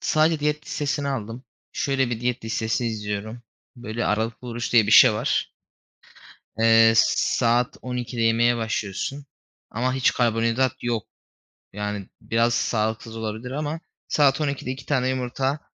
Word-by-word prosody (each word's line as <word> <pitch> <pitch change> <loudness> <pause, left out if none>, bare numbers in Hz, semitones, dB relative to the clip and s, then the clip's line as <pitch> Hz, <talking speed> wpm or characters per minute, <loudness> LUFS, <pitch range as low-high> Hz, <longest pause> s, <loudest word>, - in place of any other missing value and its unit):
Sadece 155 0 +2
diyet 150 0 -1
listesini 145 -1 -2
aldım. 120 -1 -5 0.3
Şöyle 135 -5 0
bir 115 -2 -3
diyet 125 -1 -2
listesi 110 +1 -1
izliyorum: 110 +1 -4 0.3
Böyle 120 -1 -4
aralıklı 115 +3 -2
oruç 120 0 -4
diye 115 -3 +5
bir 110 - +1
şey 125 -2 +9
var. 105 - -1 1.1
Eee, 115 0 +6
s 115 - +7 0.4
saat 120 0 +2
12.00'de 125 -1 -4
yemeye 115 +1 +3
başlıyorsun 115 +5 -3 0.4
ama 125 +3 -1
hiç 130 -1 +2
karbonhidrat 115 +1 +1
yok. 115 -4 -2 0.7
Yani, 105 -1 -4
biraz 115 +1 +1
sağlıksız 110 -1 -1
olabilir 110 +3 -5
ama 150 +3 -3 0.3
saat 140 -1 +3
12.00'de 140 -3 -2
2 130 - -8
tane 130 -3 +1
yumurta, 130 +2 -1
120 Hz, 135 wpm, -24 LUFS, 115-130 Hz, 1.1 s, şey